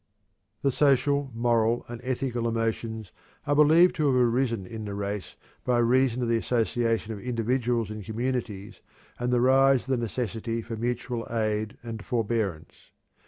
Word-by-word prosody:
The 140 Hz, -, +3 dB
social, 140 Hz, 0 st, +2 dB
moral, 115 Hz, 0 st, +1 dB
and 120 Hz, -1 st, -8 dB
ethical 125 Hz, -2 st, -2 dB
emotions 115 Hz, -2 st, -2 dB, 0.3 s
are 145 Hz, -, +1 dB
believed 160 Hz, +4 st, +6 dB
to 155 Hz, -2 st, +2 dB
have 135 Hz, -, +3 dB
arisen 120 Hz, -4 st, +1 dB
in 110 Hz, +3 st, -7 dB
the 100 Hz, -1 st, -5 dB
race 100 Hz, -1 st, -4 dB, 0.3 s
by 125 Hz, -1 st, +1 dB
reason 125 Hz, +1 st, +2 dB
of -, -, 0 dB
the 115 Hz, 0 st, +2 dB
association 115 Hz, -1 st, 0 dB
of 105 Hz, -, -7 dB
individuals 120 Hz, -1 st, -1 dB
in 105 Hz, 0 st, -6 dB
communities 110 Hz, -2 st, -4 dB, 0.4 s
and 120 Hz, 0 st, -1 dB
the 120 Hz, -1 st, +3 dB
rise 135 Hz, 0 st, +5 dB
of -, -, -18 dB
the 130 Hz, -, +2 dB
necessity 115 Hz, 0 st, -3 dB
for 115 Hz, 0 st, -6 dB
mutual 120 Hz, +1 st, -3 dB
aid 110 Hz, -2 st, -1 dB
and 115 Hz, -2 st, -6 dB
forbearance. 110 Hz, -, -3 dB
115 Hz, 155 wpm, -27 LUFS, 110-125 Hz, 0.4 s, believed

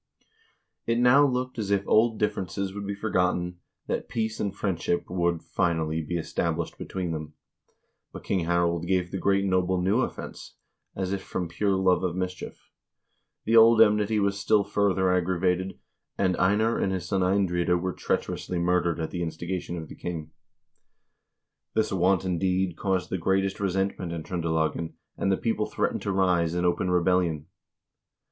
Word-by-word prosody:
It 115 Hz, 0 st, +2 dB
now 125 Hz, +4 st, +6 dB
looked 125 Hz, -1 st, -2 dB
as 105 Hz, -2 st, -3 dB
if 100 Hz, -1 st, +1 dB
old 110 Hz, 0 st, +4 dB
differences 100 Hz, -2 st, -2 dB
would 100 Hz, 0 st, -6 dB
be 100 Hz, -, -3 dB
for 110 Hz, +2 st, -4 dB
gotten, 90 Hz, -1 st, 0 dB, 0.3 s
that -, -, -3 dB
peace 110 Hz, -1 st, -2 dB
and 100 Hz, -, -1 dB
friendship 95 Hz, -3 st, -1 dB
would, 85 Hz, -2 st, 0 dB
finally, 80 Hz, -2 st, 0 dB
be 85 Hz, +3 st, -3 dB
established 80 Hz, -, -2 dB
be -, -, -5 dB
tween 90 Hz, -3 st, -3 dB
them. 75 Hz, -1 st, -6 dB, 0.8 s
But -, -, -9 dB
King 95 Hz, -4 st, 0 dB
Harald 85 Hz, 0 st, +1 dB
gave 90 Hz, -1 st, 0 dB
the 95 Hz, -, -3 dB
great 100 Hz, +1 st, +2 dB
noble 95 Hz, -1 st, +1 dB
new 95 Hz, +6 st, +2 dB
offense, -, -, -6 dB, 0.4 s
as 95 Hz, 0 st, -2 dB
if 100 Hz, -, -2 dB
from 90 Hz, -2 st, -4 dB
pure 95 Hz, +4 st, 0 dB
love 95 Hz, -1 st, +2 dB
of 90 Hz, -2 st, -1 dB
mischief. 90 Hz, 0 st, -6 dB, 0.7 s
The 115 Hz, -, +2 dB
old 115 Hz, 0 st, +7 dB
enmity 105 Hz, 0 st, +4 dB
was 100 Hz, 0 st, 0 dB
still 105 Hz, 0 st, +3 dB
further 100 Hz, -2 st, +1 dB
aggravated, 90 Hz, +1 st, 0 dB, 0.4 s
and 95 Hz, -2 st, +2 dB
Einar 105 Hz, +5 st, +2 dB
and 95 Hz, -, 0 dB
his 95 Hz, -2 st, -3 dB
son 95 Hz, -1 st, 0 dB
Eindride 90 Hz, -2 st, +2 dB
were 95 Hz, +1 st, -2 dB
treacherously 90 Hz, -, -2 dB
murdered 85 Hz, -1 st, +1 dB
at 80 Hz, -, -3 dB
the 90 Hz, -, -3 dB
instigation 85 Hz, +2 st, -4 dB
of 80 Hz, -2 st, -6 dB
the -, -, -10 dB
king. 80 Hz, -3 st, -6 dB, 1.4 s
This 110 Hz, -1 st, +1 dB
wanton 95 Hz, -1 st, +1 dB
deed 95 Hz, -1 st, 0 dB
caused 95 Hz, -1 st, -1 dB
the 95 Hz, -, -1 dB
greatest 95 Hz, +2 st, 0 dB
resentment 95 Hz, -2 st, -1 dB
in 80 Hz, -2 st, -5 dB
Tr0ndelagen, 80 Hz, -2 st, -1 dB, 0.2 s
and 95 Hz, -, 0 dB
the 95 Hz, -, +2 dB
people 110 Hz, -2 st, -1 dB
threatened -, -, -1 dB
to 100 Hz, -, -2 dB
rise 90 Hz, -3 st, +2 dB
in 90 Hz, 0 st, 0 dB
open 90 Hz, +1 st, +1 dB
rebellion. 90 Hz, -4 st, +1 dB
95 Hz, 165 wpm, -26 LUFS, 85-100 Hz, 1.4 s, old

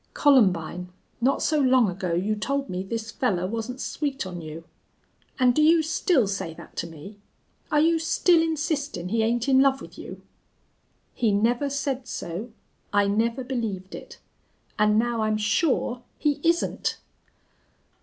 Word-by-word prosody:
"Columbine, 180 Hz, -, +3 dB, 0.3 s
not 265 Hz, +3 st, +2 dB
so 305 Hz, -1 st, +2 dB
long 255 Hz, -4 st, +4 dB
ago 180 Hz, -2 st, -2 dB
you 200 Hz, +5 st, 0 dB
told 275 Hz, +6 st, -2 dB
me 180 Hz, 0 st, -2 dB
this 225 Hz, +3 st, -5 dB
fellar 205 Hz, -11 st, 0 dB
wasn't 230 Hz, +5 st, -4 dB
sweet 280 Hz, -4 st, -3 dB
on 180 Hz, -2 st, -6 dB
you. 155 Hz, +1 st, -8 dB, 0.7 s
An' 255 Hz, -2 st, +4 dB
do 275 Hz, -, +1 dB
you 320 Hz, +1 st, +5 dB
still 315 Hz, -, +2 dB
say 190 Hz, -4 st, -4 dB
that -, -, -13 dB
to 170 Hz, -, -2 dB
me 165 Hz, +6 st, -11 dB, 0.5 s
are 300 Hz, -, +4 dB
you 325 Hz, +2 st, +3 dB
still 330 Hz, +1 st, +3 dB
insistin' 295 Hz, -, -2 dB
he 225 Hz, +2 st, +1 dB
ain't 235 Hz, +2 st, 0 dB
in 265 Hz, -1 st, +5 dB
love 270 Hz, 0 st, +3 dB
with -, -, -12 dB
you?" -, -, -9 dB, 0.9 s
"He 230 Hz, -3 st, +1 dB
never 240 Hz, +7 st, +1 dB
said 270 Hz, -2 st, -3 dB
so 190 Hz, +3 st, -5 dB, 0.4 s
I 205 Hz, 0 st, +3 dB
never 230 Hz, +5 st, 0 dB
believed 225 Hz, -7 st, -4 dB
it... -, -, -9 dB, 0.6 s
and 210 Hz, 0 st, +4 dB
now 235 Hz, 0 st, +1 dB
I'm 215 Hz, 0 st, +1 dB
sure 245 Hz, +3 st, 0 dB, 0.2 s
he 295 Hz, -2 st, 0 dB
isn't!" 335 Hz, +1 st, 0 dB
235 Hz, 155 wpm, -25 LUFS, 200-280 Hz, 0.9 s, you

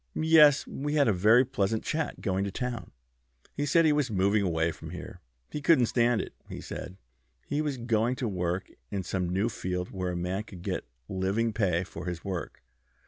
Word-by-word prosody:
"Yes. 155 Hz, -3 st, +6 dB
We 145 Hz, +2 st, -3 dB
had 145 Hz, -3 st, +4 dB
a 110 Hz, -, +4 dB
very 110 Hz, +7 st, +5 dB
pleasant 110 Hz, -4 st, -1 dB
chat 160 Hz, -1 st, -2 dB
going 95 Hz, -1 st, 0 dB
to 100 Hz, -, -2 dB
town. 120 Hz, -4 st, -4 dB, 0.6 s
He 145 Hz, -, -2 dB
said 165 Hz, +3 st, +4 dB
he 155 Hz, -, +5 dB
was 145 Hz, -3 st, +1 dB
moving 100 Hz, +1 st, +2 dB
away 85 Hz, -3 st, +1 dB
from -, -, -9 dB
here. -, -, -8 dB, 0.3 s
He 150 Hz, -, -4 dB
couldn't 140 Hz, -4 st, +5 dB
stand 120 Hz, 0 st, +2 dB
it, -, -, -8 dB, 0.2 s
he -, -, -6 dB
said. 90 Hz, +1 st, -7 dB, 0.5 s
He 145 Hz, +1 st, -1 dB
was 145 Hz, -3 st, -2 dB
going 120 Hz, 0 st, +1 dB
to 125 Hz, -, -2 dB
work 90 Hz, -2 st, -2 dB, 0.2 s
in 95 Hz, -2 st, -3 dB
some 90 Hz, -1 st, -2 dB
new 95 Hz, +5 st, +1 dB
field 90 Hz, -5 st, -3 dB
where 90 Hz, -2 st, -3 dB
a -, -, -3 dB
man 90 Hz, +3 st, -2 dB
could 95 Hz, -5 st, -11 dB
get -, -, -3 dB, 0.2 s
living 100 Hz, +4 st, 0 dB
pay 90 Hz, -5 st, +1 dB
for 90 Hz, -, -8 dB
his 90 Hz, +1 st, -5 dB
work. 90 Hz, -6 st, -5 dB
105 Hz, 195 wpm, -29 LUFS, 95-130 Hz, 0.6 s, Yes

